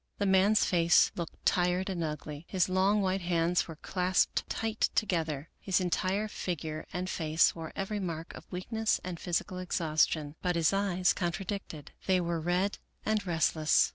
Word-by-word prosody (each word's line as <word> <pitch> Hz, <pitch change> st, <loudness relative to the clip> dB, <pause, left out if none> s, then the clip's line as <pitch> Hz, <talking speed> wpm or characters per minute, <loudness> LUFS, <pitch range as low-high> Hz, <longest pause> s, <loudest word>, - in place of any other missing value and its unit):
The 205 Hz, -, 0 dB
man's 195 Hz, +2 st, +4 dB
face 170 Hz, -1 st, +4 dB
looked 170 Hz, -2 st, -7 dB
tired 180 Hz, 0 st, +2 dB
and 180 Hz, -4 st, -2 dB
ugly. 150 Hz, 0 st, -5 dB
His 185 Hz, -3 st, +2 dB
long 195 Hz, +3 st, +2 dB
white 190 Hz, 0 st, 0 dB
hands 175 Hz, 0 st, +1 dB
were 165 Hz, -, -7 dB
clasped 180 Hz, +3 st, 0 dB
tight 225 Hz, 0 st, 0 dB
together. 160 Hz, -7 st, -1 dB
His 190 Hz, -1 st, +1 dB
entire 185 Hz, +3 st, 0 dB
figure 160 Hz, -6 st, -4 dB
and 180 Hz, +1 st, -3 dB
face 160 Hz, -3 st, +2 dB
wore 165 Hz, -1 st, -7 dB
every 205 Hz, +2 st, -2 dB
mark 165 Hz, -3 st, -4 dB
of -, -, -12 dB
weakness 220 Hz, +5 st, -1 dB
and 180 Hz, -2 st, -5 dB
physical 180 Hz, +2 st, -2 dB
ex 180 Hz, -1 st, -2 dB
haustion; 155 Hz, -2 st, +1 dB
but 180 Hz, -1 st, 0 dB
his 165 Hz, +2 st, +3 dB
eyes 185 Hz, -3 st, +2 dB
contradicted. 175 Hz, -3 st, -4 dB, 0.2 s
They 185 Hz, -1 st, +4 dB
were 170 Hz, -2 st, -1 dB
red 180 Hz, +4 st, 0 dB, 0.3 s
and 215 Hz, -1 st, +1 dB
restless. 160 Hz, -2 st, +3 dB
180 Hz, 165 wpm, -30 LUFS, 165-190 Hz, 0.3 s, man's